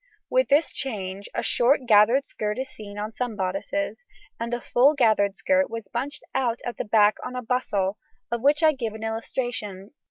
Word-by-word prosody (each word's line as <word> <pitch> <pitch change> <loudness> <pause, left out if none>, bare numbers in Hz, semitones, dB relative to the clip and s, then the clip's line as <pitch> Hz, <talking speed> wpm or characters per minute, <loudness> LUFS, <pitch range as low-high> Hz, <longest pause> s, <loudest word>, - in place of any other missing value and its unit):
With - - +3
this 295 +3 +3
change 200 -6 -4
a - - -1
short 255 +2 +3
gathered 230 +5 +5
skirt 210 -2 -3
is 260 0 -3
seen 205 -4 -10
on 210 +2 -4
some 245 -2 -3
bodices, 195 - -3 0.4
and 230 +1 -3
the 240 - -1
full 270 +5 +3
gathered 215 -6 +3
skirt 280 +6 +2
was 230 -3 -6
bunched 270 +5 -4
out 245 -3 0
at 240 - -4
the - - -3
back 210 0 +4
on 250 - -6
a 250 - -4
bustle, 210 -5 -1 0.3
of 235 -1 -1
which 290 +4 +3
I 315 - +7
give 235 -7 -4
an 220 - -8
illustration 225 -3 -4
(p. - - -38
235 Hz, 195 wpm, -25 LUFS, 210-265 Hz, 0.4 s, I